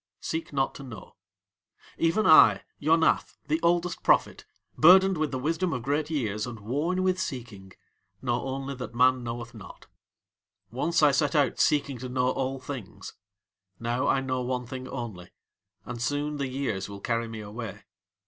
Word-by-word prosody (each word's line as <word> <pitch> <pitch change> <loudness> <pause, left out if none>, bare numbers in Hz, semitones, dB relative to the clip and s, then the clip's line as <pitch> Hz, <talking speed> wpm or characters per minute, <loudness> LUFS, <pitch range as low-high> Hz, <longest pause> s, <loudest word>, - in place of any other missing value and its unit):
Seek 160 +1 -4
not 135 -2 0
to - - -10
know. 115 -7 -11 0.8
Even 165 +7 +2
I, 155 - +7 0.2
Yonath, 160 +2 +2
the 155 +1 +1
oldest 175 +1 +1
prophet, - - +2 0.3
burdened 190 +4 +7
with 155 -2 -1
the 130 - -3
wisdom 165 +6 -1
of 125 -4 -4
great 145 +4 -1
years, 110 -8 -2
and 115 -2 -7
worn 150 - -1
with 185 0 +1
seeking, 110 - -6 0.5
know 120 -2 -1
only 135 +1 -4
that 125 -2 -8
man 130 0 +4
knoweth 120 0 -6
not. 110 -4 -12 0.9
Once 165 +7 0
I 145 - +7
set 140 +2 +1
out 140 -5 +2
seeking 140 -3 +1
to 130 +1 -6
know 125 0 +1
all 135 +1 -2
things. 110 -8 -8 0.7
Now 120 +2 -1
I 135 - +2
know 130 -1 -2
one 125 0 -2
thing 130 +1 -7
only, 100 -9 -7 0.6
and 120 -1 -6
soon 145 +4 -1
the 140 -2 -2
Years 125 -8 -3
will 100 0 -8
carry 115 +2 -1
me 110 -1 -7
away. 105 +1 -7
130 Hz, 165 wpm, -27 LUFS, 120-150 Hz, 0.9 s, I